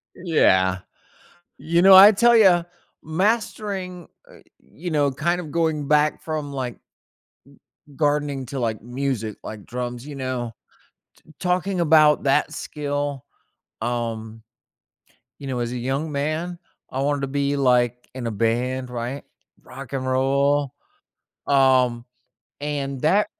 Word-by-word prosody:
Yeah. 95 - +2 0.8
You 170 +1 +1
know, 190 +1 +8
I 195 +3 +10
tell 235 +3 +4
ya, 185 -6 +5 0.4
mastering 190 0 -2 0.2
uh, - - -16 0.2
you 175 +2 -8
know, 145 -2 +2
kind 170 +6 -1
of 155 -4 -9
going 160 -3 0
back 150 +1 +2
from, 155 -3 -4
like 125 -3 -4
g - - -33 1.2
gardening 145 -2 0
to, 135 +2 -5
like, 110 -3 -2
music, 120 -4 -3
like, 105 -2 -8
drums, 125 0 -5
you 145 - -7
know, 130 -3 -4 0.7
t 155 - -18
talking 185 +1 0
about 155 -2 +4
that 140 +1 +2
skill, 145 -2 -4 0.6
um 115 -1 -4 1.0
you 140 - -8
know, 130 -2 -3
as 120 0 -2
a 125 - -4
young 135 +6 -2
man, 155 +5 -3 0.3
I 135 - -2
wanted 145 0 0
to 135 - -2
be 140 +1 -1
like, 125 -2 +1
in 125 -3 -4
a 115 - -2
band, 125 +4 -1
right, 125 +3 -5 0.4
Rock 130 0 -10
and 130 -1 -2
Roll, 140 +2 +1 0.7
um, 130 -3 +3 0.6
and 140 -2 -3
that 195 +7 +3
140 Hz, 135 wpm, -23 LUFS, 125-155 Hz, 1.2 s, I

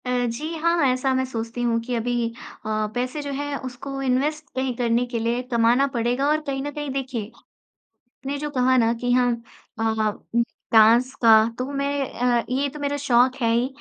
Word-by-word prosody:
अ, - - -3 0.2
जी, 295 +8 -4
हाँ, 335 +2 +2
ऐसा 255 +1 0
मैं 260 0 +1
सोचती 230 -1 -5
हूँ 235 -1 +1
कि 245 +1 -3
अभी 240 +1 -1 0.5
अ, 215 0 -1
पैसे 255 +4 -2
जो 285 -1 -5
हैं 290 +1 -3
उसको 270 +2 -6
इन्वेस्ट 280 +4 0
कहीं 260 -1 -1
करने 240 0 +1
के 240 -1 -3
लिए 235 +2 0
कमाना 235 +4 +3
पड़ेगा। 245 +4 +1
और 305 +1 +2
कहीं 270 -1 -2
न 290 - -4
कहीं 295 0 -5
देखिए, 255 -5 -4 1.0
ने 280 +1 -2
जो 295 +1 -4
कहा 255 -1 +2
ना 230 -2 +3
कि 245 0 +1
हाँ, 250 0 +3 0.5
अ, - - -2 0.5
उम, 235 - +4 0.3
डाँस 230 +4 +5
का, 230 -1 +7 0.3
तो 250 - -1
मैं 280 -1 -1
अ, 240 -1 +1
ये 275 +3 0
तो 295 +2 -9
मेरा 285 0 -1
शौक़ 260 -1 +2
है 230 -1 +3
ही 240 +2 +2
255 Hz, 195 wpm, -23 LUFS, 235-280 Hz, 1.0 s, का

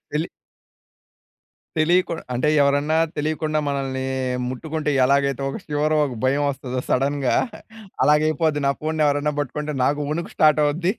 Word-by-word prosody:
తెలీ 150 +2 -1 1.5
తెలియకు 175 +3 +3 0.2
అంటే 130 +5 +1
ఎవరన్నా 145 +3 +2 0.2
తెలియకుండా 155 +1 -1
మనల్ని 135 -1 -2 0.4
ముట్టుకుంటే, 150 +4 -3
ఎలాగైతే 140 0 +1
ఒక 135 - -5
శివర్, 150 0 0
ఒక 135 -4 -4
భయం 140 +3 +2
వస్తదో, 130 -2 -3
సడెన్‌గా. 135 0 +1 0.7
అలాగ 150 0 +5
అయిపోద్ది 155 -1 0
నా 140 - +3
ఫోన్‌ని 155 0 0
ఎవరైనా 145 +1 +1
పట్టుకుంటే, 150 +2 -4
నాకు 145 +2 +1
వణుకు 165 +3 -3
స్టార్ట్ 155 -1 +4
అవుద్ది. 170 +6 +1
150 Hz, 130 wpm, -22 LUFS, 140-155 Hz, 1.5 s, అలాగ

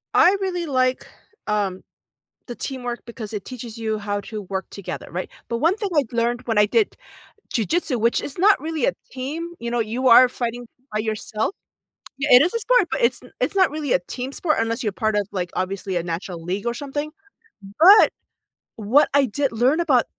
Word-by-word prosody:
I 370 +3 +6
really 360 -3 -2
like, 255 -3 +1 0.4
um, 200 -3 -1 0.6
the 240 - -7
teamwork 245 -3 -5
because 225 -2 -8
it 210 - -4
teaches 240 -3 -8
you 220 -1 -2
how 205 -1 -3
to 210 0 -7
work 190 0 -4
together, 200 - -7
right? 180 +2 -4 0.2
But 235 - -1
one 330 +9 +2
thing 415 -2 -3
I've 275 -5 +1
learned 240 +1 0
when 225 -3 -1
I 210 - +6
did 430 - +1 0.6
jujitsu, 275 - 0
which 235 +1 +2
is 280 - -7
not 395 +3 +5
really 315 -4 -2
a - - +3 0.2
team, 305 +7 -5
you 235 0 -4
know, 240 - 0
you 235 +4 -1
are 250 +2 +9
fighting 245 -1 -4 0.3
by 215 - -1
yourself 215 - -2 0.6
Yeah, 295 +2 -2
it 250 - +9
is 345 +5 +2
a - - +1
sport, - - +3
but - - -1
it's 235 +2 +2
n 250 - -16
it's 255 - -1
not 375 -3 +4
really 295 -3 -2
a - - +4
team 255 +2 -5
sport 310 +2 0
unless 225 0 -1
you're 210 - 0
part 215 +1 0
of, 205 -2 0
like, 180 -3 -3
obviously, 190 0 -3
a - - 0
natural 170 0 -5
league 190 +5 -3
or 235 - 0
something. 290 +4 -4 0.7
But 390 +6 +8 0.7
what 225 +7 +3
I 285 -1 +5
did 275 +4 -1
learn 250 +8 +2
about 275 -9 +3
240 Hz, 200 wpm, -22 LUFS, 215-290 Hz, 0.7 s, are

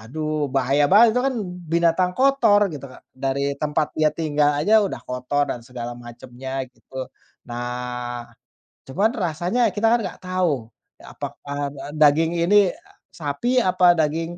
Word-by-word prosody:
waduh 155 +6 -3
bahaya 135 +2 +3
banget 220 +3 +6
itu - - +2
kan 270 - 0 0.4
binatang 170 +2 +2
kotor," 235 -7 +4
gitu, 140 -2 -7
Kak, 130 - -15
dari 135 +1 -1
tempat 150 0 0
dia 155 -1 +4
tinggal 150 -2 +1
aja 215 +9 +4
udah - - -6
kotor 125 +3 -1
dan 120 - -4
segala 120 -2 -6
macamnya 125 +2 -7
gitu. 130 +1 -9 0.4
Nah, 120 0 -5 0.6
cuman 195 +12 +1
rasanya 180 +5 0
kita 220 +2 +2
kan 240 - +4
enggak 180 - -7
tahu 175 -11 -1 0.3
apakah, - - -8
eee, 145 0 -3 0.3
daging 155 +2 +4 0.2
ini 205 +3 +5 0.6
sapi 165 - -2
apa 180 -3 +4
daging 165 +2 -1
150 Hz, 140 wpm, -22 LUFS, 130-180 Hz, 0.6 s, banget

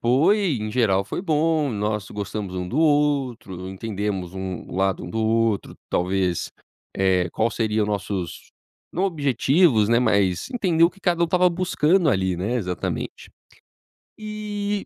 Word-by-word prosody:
Foi, 155 - +3
em 110 - -3
geral, 105 -5 +2
foi 110 - -4
bom. 155 -3 +1
Nós 105 -2 -2
gostamos 100 -1 -5
um 90 -1 -3
do 130 - -2
outro, 140 - +1
entendemos 95 -2 -4
um 95 -2 -5
o - - -7
lado 95 0 0
um 90 - -7
do 110 - -3
outro 110 -2 0
talvez, 90 -1 0 0.5
eh, 95 -2 +2
qual 110 +5 0
seria 110 -1 0
o - - 0
nossos 100 -3 -4 0.4
não 185 - 0
objetivos, 140 - +3
né, 115 0 +4
mas 100 -7 +1
entender 180 -9 +2
o 170 - +4
que 195 - -22
cada 175 -2 +1
um - - +6
estava 180 +2 +3
buscando 175 -1 +2
ali, 95 -5 0
né, 100 +7 -2
exatamente. 90 -6 -4 0.9
E 210 -1 -4
115 Hz, 155 wpm, -23 LUFS, -, 0.9 s, um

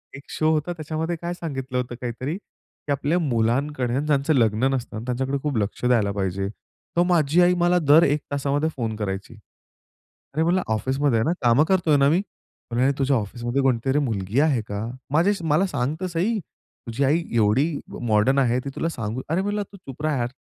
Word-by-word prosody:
एक 140 - -10
शो 155 0 +1
होता 155 +2 0
त्याच्यामध्ये 160 +1 -3
काय 175 +1 -3
सांगितलं 135 -7 -4
होतं 125 -1 -3
काहीतरी, 130 +6 -3
की 150 - -12
"आपल्या 145 +5 +1
मुलांकडे 125 -1 0
ना 135 - +1
ज्यांचं 150 +1 +2
लग्न 115 -1 +2
नसतं 120 -4 -3
ना, 110 - -6
त्यांच्याकडे 130 +2 -1
खूप 145 -6 -1
लक्ष 105 +4 -2
द्यायला 115 -5 +3
पाहिजे." 95 -1 -2 0.5
तर 175 - +5
माझी 165 0 +3
आई 175 0 +5
मला 175 +1 +4
दर 155 +1 +6
1 150 -1 +2
तासामध्ये 145 +2 0
फोन 115 -3 -2
करायची. 100 +1 -4 1.0
अरे 160 +2 +1
म्हणलं 180 +2 +2
ऑफिसमध्ये 130 +2 +1
आहे - - +1
ना. 170 - +2
कामं 120 +4 +5
करतो 185 -4 +2
आहे 145 -2 +5
ना 140 +1 +5
मी. 170 +4 +3
बोलली, 120 -10 -7
"नाही 140 +1 +3
तुझ्या 135 0 +3
ऑफिसमध्ये 120 +5 -2
कोणतीतरी 135 +2 +2
मुलगी 110 -3 -1
आहे 145 -6 +3
का? 105 +2 -3 0.3
माझ्याशी 175 +3 +2
मला 155 +6 +3
सांग 140 -2 -1
तर - - -1
सही. 185 +7 0 0.5
तुझी 115 +5 -1
आई 160 +5 +2
एवढी 120 +9 +3 0.3
मॉडर्न 120 +3 +2
आहे 125 -1 +2
ती 140 - -2
तुला 165 - -1
सांगू" 115 -3 -4
अरे 165 +4 +1
मी - - -3
म्हणलं, 205 0 -1
"तू 200 - -12
चुप 140 -7 -11
रहा 155 -2 +1
यार! 120 -1 -1
140 Hz, 200 wpm, -24 LUFS, 120-160 Hz, 1.0 s, दर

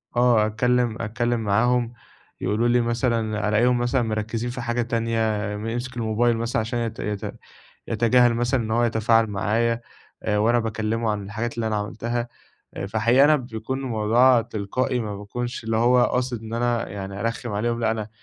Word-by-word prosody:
آه، 120 -3 +4
أتكلّم 120 +1 +1
أتكلّم 120 +2 -1
معاهم 115 +3 +1 0.5
يقولوا 105 +5 +1
لي 120 0 +3
مثلًا 115 -3 0
ألاقيهم 120 +4 +3
مثلًا 120 +1 +1
مركّزين 110 +1 -2
في 125 0 -5
حاجة 120 +1 -1
تانية، 115 -1 -1 0.4
م 110 +2 -5
يمسك 120 +2 -4
الموبايل 115 +1 +1
مثلًا 115 +1 -1
عشان 115 +2 -2
يت 115 -1 -3
يت 105 -1 -4 0.5
يتجاهل 120 0 +3
مثلًا 120 +1 0
إن 110 - -4
هو 120 +2 +2
يتفاعل 115 0 +3
معايا 115 +3 0 0.4
آآ، 105 -1 0
وأنا 115 +3 +3
باكلّمه 110 0 -1
عن 100 -1 -3
الحاجات 110 +4 -4
اللي 115 -1 -1
أنا 110 - -1
عملتها 115 +3 -3 0.5
آآ، - - -4
فحقيقي 115 +6 +4
أنا 155 0 +5
بيكون 120 0 -5
الموضوع 120 0 +3
تلقائي، 110 +5 -2
ما 105 -3 -4
باكونش 120 +4 -5
اللي 110 0 0
هو 120 +2 +4
قاصد 125 -3 -1
إن 110 +1 -6
أنا 120 -1 0
يعني 100 0 -6
أرخّم 115 0 -3
عليهم، 115 +3 -1
لأ، 110 - +2
أنا 110 -1 -3
115 Hz, 170 wpm, -24 LUFS, 110-120 Hz, 0.5 s, أنا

